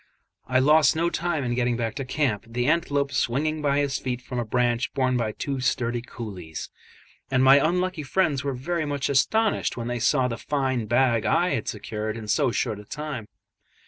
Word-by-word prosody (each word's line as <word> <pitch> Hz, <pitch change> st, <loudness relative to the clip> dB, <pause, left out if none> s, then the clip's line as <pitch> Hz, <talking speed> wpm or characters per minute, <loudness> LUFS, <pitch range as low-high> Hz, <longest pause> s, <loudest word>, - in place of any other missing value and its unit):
I 130 Hz, -, +2 dB
lost 150 Hz, +2 st, +5 dB
no 170 Hz, +2 st, +1 dB
time 170 Hz, -3 st, -1 dB
in 120 Hz, -1 st, -1 dB
getting 120 Hz, -1 st, 0 dB
back 115 Hz, -2 st, -2 dB
to 135 Hz, -, -3 dB
camp, 130 Hz, -5 st, -1 dB
the 120 Hz, +1 st, -2 dB
antelope 145 Hz, -2 st, +1 dB
swinging 150 Hz, +7 st, 0 dB
by 140 Hz, -1 st, +1 dB
his 140 Hz, -1 st, 0 dB
feet 125 Hz, -2 st, -3 dB
from 125 Hz, 0 st, -5 dB
a -, -, 0 dB
branch 120 Hz, +1 st, 0 dB
borne 130 Hz, -2 st, +1 dB
by 115 Hz, -3 st, 0 dB
two 135 Hz, +5 st, -4 dB
sturdy 120 Hz, -1 st, 0 dB
coolies: 100 Hz, -10 st, -7 dB, 0.6 s
and 130 Hz, 0 st, +2 dB
my 135 Hz, +1 st, +8 dB
unlucky 180 Hz, +3 st, +1 dB
friends 145 Hz, -2 st, 0 dB
were 140 Hz, -2 st, -2 dB
very 155 Hz, +5 st, -2 dB
much 145 Hz, -2 st, -1 dB
astonished 220 Hz, -, +1 dB
when 120 Hz, 0 st, -4 dB
they 120 Hz, 0 st, -2 dB
saw 125 Hz, +2 st, +2 dB
the 115 Hz, -3 st, -4 dB
fine 130 Hz, -5 st, -1 dB
bag 120 Hz, -1 st, +2 dB
I -, -, +3 dB
had -, -, -2 dB
secured 110 Hz, +1 st, -4 dB
in 110 Hz, -2 st, -7 dB
so 135 Hz, +5 st, +2 dB
short 110 Hz, -2 st, -1 dB
a -, -, -10 dB
time. 150 Hz, -5 st, -5 dB
130 Hz, 195 wpm, -25 LUFS, 120-145 Hz, 0.6 s, my